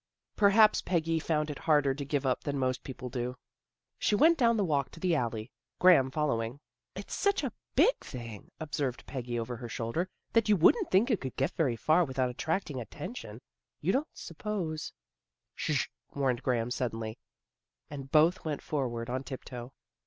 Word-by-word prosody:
Perhaps 210 +1 +6
Peggy 165 -2 0
found 150 -1 0
it 145 - -7
harder 145 -4 +3
to 140 +1 -5
give 140 0 -1
up 130 - +1
than 140 -1 -2
most 130 -1 0
people 130 -1 -7
do. 125 0 -3 0.6
She 210 - +2
went 325 +10 +6
down 235 -5 +3
the 205 - +2
walk 145 -5 +1
to - - -11
the 180 0 +1
alley, 115 -5 -1 0.3
Graham 170 -8 +6
following. 130 -4 -1 0.2
" - - -59
It's - - -7
such 400 0 +1
a - - -2 0.2
big - - +5
thing," 115 -5 -8
observed 145 -5 -3
Peggy 125 -3 -4
over 115 +1 -4
her 120 -1 -7
shoulder, 120 +12 -2
" - - -46
that 225 -1 +3
you 210 - +6
wouldn't 350 - +4
think 215 +8 +4
it 215 - +1
could 130 -2 -5
get 135 +6 0
very 135 -8 +1
far 155 +9 +3
without 130 -4 -1
attracting 155 0 -2
attention. 120 - -8 0.4
You 175 +6 +1
don't 275 +5 +1
suppose 170 -3 -4 0.3
" - - -60
Sh! - - 0
" - - -32
warned 130 -3 +1
Graham 120 -3 0
suddenly, 115 -3 -3 0.7
and 135 -2 -7
both 160 +4 +4
went 150 -3 -3
forward 120 -6 -2
on 130 +2 -2
tiptoe. 125 -2 -7
140 Hz, 180 wpm, -30 LUFS, 125-170 Hz, 0.7 s, Perhaps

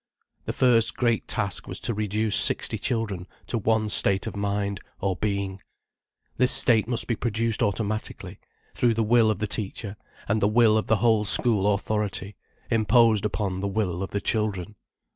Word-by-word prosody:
The - - -3
first 120 -3 +2
great 120 -3 0
task 100 -1 -1
was - - -6
to 115 - -2
reduce 105 0 -1
sixty - - +1
children 105 -6 -3 0.2
to 115 - -2
one 110 0 +1
state 100 -1 +1
of - - -5
mind, 100 -1 -2 0.2
or 95 -1 -1
being. 100 -2 -3 0.8
This 125 0 +3
state 115 -3 +4
must 120 -1 +2
be 120 - -1
produced 115 0 -1
automatically, 110 +1 -2 0.3
through 120 -2 +1
the 115 - +1
will 115 0 +4
of 110 - 0
the 105 - -2
teacher, 105 0 -5 0.3
and 110 +1 0
the 100 - +4
will 110 0 +4
of 110 - 0
the 110 - +3
whole 110 -1 +2
school 105 -2 +2
authority, 105 -1 -3 0.4
imposed 115 -1 +3
upon 100 -3 -2
the 100 - -2
will 95 -3 -2
of 95 - -3
the 100 - -3
children. 105 -3 -1
105 Hz, 170 wpm, -25 LUFS, 100-115 Hz, 0.8 s, state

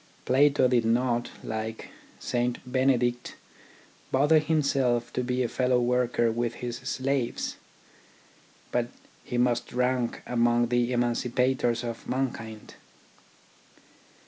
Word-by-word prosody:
Plato 140 0 +4
did 125 -2 +2
not, 120 +1 +1
like 110 0 -5 0.3
St. 120 0 -1
Benedict, 125 -1 +1 0.8
bother 150 +4 +4
himself 140 -6 +1
to 125 - -1
be 125 +1 0
a - - 0
fellow 125 +1 +1
worker 120 -1 +1
with 120 0 -2
his 120 -1 -5
slaves; 130 -1 -2 1.1
but 120 -1 0 0.4
he 125 - -4
must 120 -1 +1
rank 125 -1 0
among 120 0 +2
the 120 0 +1
emancipators 120 0 +1
of 115 -1 -6
mankind. 115 -5 -4
125 Hz, 105 wpm, -27 LUFS, 120-130 Hz, 1.1 s, Plato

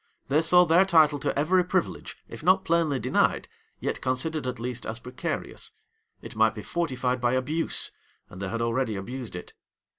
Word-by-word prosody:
They 150 +3 +3
saw 180 +2 +5
their 170 +3 +5
title 160 -6 +4
to - - -2
every 180 +6 +3
privilege, 180 0 -2
if - - -10
not 185 +3 +3
plainly 165 -4 +2
denied, - - +1 0.3
yet - - -3
considered 130 +3 -1
at 125 - -3
least 120 -1 -5
as 110 - -4
precarious. 125 +2 -5 0.5
It - - -9
might 110 +1 +3
be 105 - -7
fortified 130 -7 -1
by 120 0 +2
abuse; 145 +6 0 0.4
and 95 - -11
they 100 - -3
had 115 +2 -2
already 115 -1 0
abused 120 +3 -6
it. 90 - -8
130 Hz, 175 wpm, -26 LUFS, 120-165 Hz, 0.5 s, saw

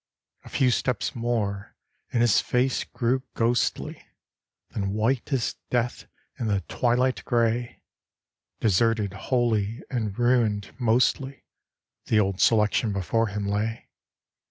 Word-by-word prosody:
A - - -12
few 130 -2 +2
steps 125 -1 -1
more 110 -5 -2 0.4
and 120 - +2
his 120 -4 +4
face 125 +1 +1
grew 125 +2 0
ghostly, 120 +1 0 0.7
Then 100 -2 -2
white 115 +6 0
as 130 -4 0
death 120 0 -1 0.3
in 115 - -1
the 100 -2 +1
twilight 125 +6 0
grey; 120 -1 0 0.8
Deserted 110 -1 +2
wholly, 110 +1 0
and 110 -6 -2
ruined 115 -5 +1
mostly, 130 +3 +1 0.6
The 110 - +3
Old 100 -2 0
Selection 105 0 +3
before 100 +4 0
him 105 0 -4
lay. 105 +3 -2
115 Hz, 115 wpm, -26 LUFS, 105-120 Hz, 0.8 s, his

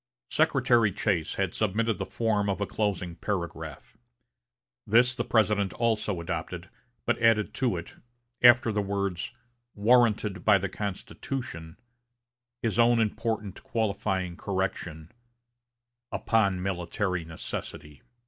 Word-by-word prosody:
Secretary 115 -4 +3
Chase 90 -4 -1
had 95 -3 -1
submitted 110 0 0
the 95 - -3
form 105 -3 0
of 100 - -1
a 100 - 0
closing 95 -5 -2
paragraph. 85 -3 -5 0.9
This 120 +4 +5
the 125 - -2
President 105 -4 +2
also 105 -5 0
adopted, 85 +1 -5 0.3
but - - +1
added 115 -2 +3
to 120 -9 0
it, 85 - -9 0.4
after 120 -1 +7
the 105 -1 0
words 100 -1 -2 0.4
"warranted 105 -4 +3
by 105 -2 +6
the 95 0 -3
Constitution," 100 -3 -5 0.9
his 115 0 0
own 120 0 +5
important 110 -2 -2
qualifying 100 -5 -1
correction, 90 -4 -3 1.0
"upon 100 -5 +1
military 90 0 -2
necessity." 75 -3 -7
100 Hz, 110 wpm, -28 LUFS, 90-110 Hz, 1.0 s, after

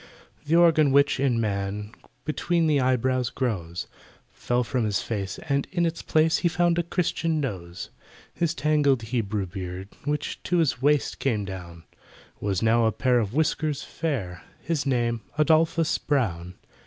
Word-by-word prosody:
The 160 - +3
organ 160 -4 +5
which, 140 0 +4
in 130 -4 +2
man, 105 -1 -2 0.3
Between 165 +2 0
the 150 -3 +3
eyebrows 130 -1 +1
grows, 90 -9 -3 0.5
Fell 125 0 -1
from 125 0 -1
his 105 -2 0
face, 100 -4 -3
and 140 -1 0
in 175 -2 +1
its 165 0 -2
place 160 +1 +2
He - - +1
found 175 0 +2
a - - +4
Christian 165 -2 -1
nose. 90 -11 -5 0.4
His 170 -1 -1
tangled 145 -4 +2
Hebrew 110 -3 -2
beard, 95 +1 -6 0.2
Which 150 0 -2
to 180 - 0
his 155 -7 +1
waist 145 +1 +2
came 110 -7 0
down, 85 -3 -8 0.6
Was 100 0 -1
now 115 +1 +4
a - - +2
pair 125 +2 +2
of 110 +1 -2
whiskers 155 -1 0
fair— 115 - -3 0.2
His 150 -1 -1
name 120 -3 0 0.2
ADOLPHUS 160 +1 +3
BROWN! 90 - -1
130 Hz, 155 wpm, -25 LUFS, 105-155 Hz, 0.6 s, organ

